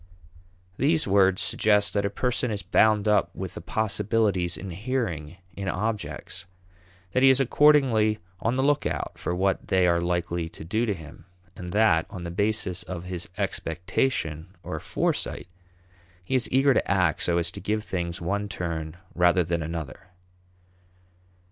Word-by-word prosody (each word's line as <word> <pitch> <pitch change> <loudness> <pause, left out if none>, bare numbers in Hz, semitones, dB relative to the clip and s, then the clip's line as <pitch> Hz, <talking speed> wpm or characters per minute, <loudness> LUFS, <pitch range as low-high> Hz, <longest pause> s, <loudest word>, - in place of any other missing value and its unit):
These 155 +2 +2
words 95 -1 +4
suggest 105 -3 +2
that 100 0 +1
a - - -3
person 125 +3 -1
is 105 -3 -2
bound 105 +3 +3
up 105 -1 +3
with - - -5
the - - -7
possibilities 105 -4 0
inhering 90 - -3 0.2
in 100 -1 -5
objects; 105 0 -3 0.6
that 130 - +1
he 135 - +7
is 130 0 +5
accordingly 130 -6 +4 0.2
on 115 +5 0
the 130 - +1
lookout 145 0 0
for 90 - -2
what 95 +1 0
they 95 -1 +3
are 85 -1 +3
likely 85 -1 -1
to 80 - -10
do 110 +7 0
to 105 - 0
him; 80 -1 -12 0.3
and 90 -1 -7
that, 105 -6 +3
on 90 - -7
the 85 - -5
basis 100 -2 -1
of 90 -1 -6
his 90 -1 -6
expectation 85 - -2
or - - -4
foresight, - - -2 0.8
he 90 - -5
is 130 -2 +2
eager 135 +1 +4
to - - 0
act 90 -4 +2
so 85 -1 +1
as 85 0 0
to - - -9
give 105 +3 -1
things 85 -4 -3
one 100 +4 -2
turn 80 -3 -4 0.2
rather 90 +1 +4
than 85 0 -1
another. 80 +1 -6
95 Hz, 155 wpm, -26 LUFS, 85-110 Hz, 0.8 s, he